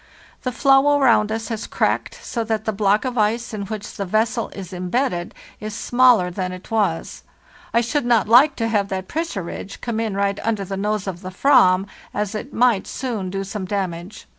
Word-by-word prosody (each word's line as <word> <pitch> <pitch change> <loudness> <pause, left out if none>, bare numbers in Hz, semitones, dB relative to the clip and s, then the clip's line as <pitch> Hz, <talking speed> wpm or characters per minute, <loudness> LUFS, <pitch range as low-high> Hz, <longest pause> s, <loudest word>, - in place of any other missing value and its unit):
The 255 - -2
floe 275 +2 +4
around 230 -5 +4
us 225 0 -3
has 225 -2 -4
cracked, - - -1
so 235 - -2
that 220 0 -2
the 220 - 0
block 205 +3 +2
of 250 -2 -2
ice 225 +2 0
in 200 -2 -4
which 210 0 -6
the 200 - -2
vessel 220 +5 0
is 190 -2 -8
embedded 180 0 -2 0.2
is 215 0 -6
smaller 245 -7 +4
than 185 0 -3
it 185 +4 -10
was. 220 -2 -1 0.5
I 235 - +3
should 240 +2 -1
not 235 -4 +4
hke 250 +7 +6
to 225 - -1
have 205 -3 +1
that 190 -1 -4
pressure 320 - -3
ridge 195 +3 -7
come 235 -2 -3
in 220 -3 -2
right 200 0 0
under 215 -3 -1
the 195 - -4
nose 210 +1 -1
of 185 -3 -5
the 185 - -6
/vam, 185 -4 +4 0.3
as 210 0 -1
it 225 +6 -5
might 235 -4 +2
soon 225 -8 -3
do 195 +1 -3
some 195 0 -5
damage. 185 0 -4
215 Hz, 200 wpm, -21 LUFS, 195-235 Hz, 0.5 s, hke